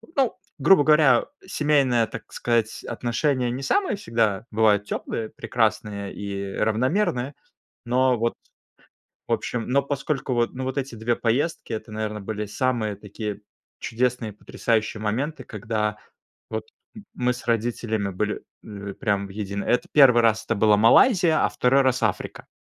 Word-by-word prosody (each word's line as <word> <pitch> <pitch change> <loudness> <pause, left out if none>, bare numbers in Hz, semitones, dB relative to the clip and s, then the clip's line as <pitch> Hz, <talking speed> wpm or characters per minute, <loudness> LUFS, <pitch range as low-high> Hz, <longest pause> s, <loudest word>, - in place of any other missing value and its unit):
ну, 270 -5 +1 0.2
грубо 190 -6 +6
говоря, 150 -5 +5 0.2
семейная, 140 - +2
так - - -9
сказать, 115 -2 -1
отношения 125 +1 -1
не 130 +3 -4
самые 385 - +1
всегда 115 - 0
бывают 105 -2 +3
теплые, 110 +1 -4
прекрасные 105 -3 -1
и 100 -1 -5
равномерные, 125 - 0 0.5
но 125 +1 +2
вот, 115 +1 0 0.9
в - - +1
общем. 115 -2 -2
Но 140 +2 +3
поскольку 140 -1 -2
вот, 120 -1 0
ну, 130 - -5
вот 130 +2 -3
эти 135 -3 -3
2 115 +2 0
поездки, 125 +3 -1
это, 110 0 -6
наверно, 105 -1 -4
были 105 +1 -4
самые 110 -1 -1
такие 105 +1 -6 0.4
чудесные, 120 -2 -1
потрясающие 110 +1 -2
моменты, 130 +7 -2
когда 105 -1 -3 0.5
вот 110 -1 -3 0.3
м 215 - -10
мы 125 0 +1
с 120 - -10
родителями 115 -3 -1
были, 105 +3 -2 0.2
ли 100 -2 -7
прям 100 -4 -1
в - - -13
единый 100 0 -4
это 125 - +1
1 125 -5 +7
раз 110 -1 +2
это 115 - -1
была 105 0 +4
Малайзия, 165 - +5
а - - +3
2 130 +2 +3
раз 130 -1 +1
Африка. - - -2
115 Hz, 150 wpm, -24 LUFS, 105-130 Hz, 0.9 s, 1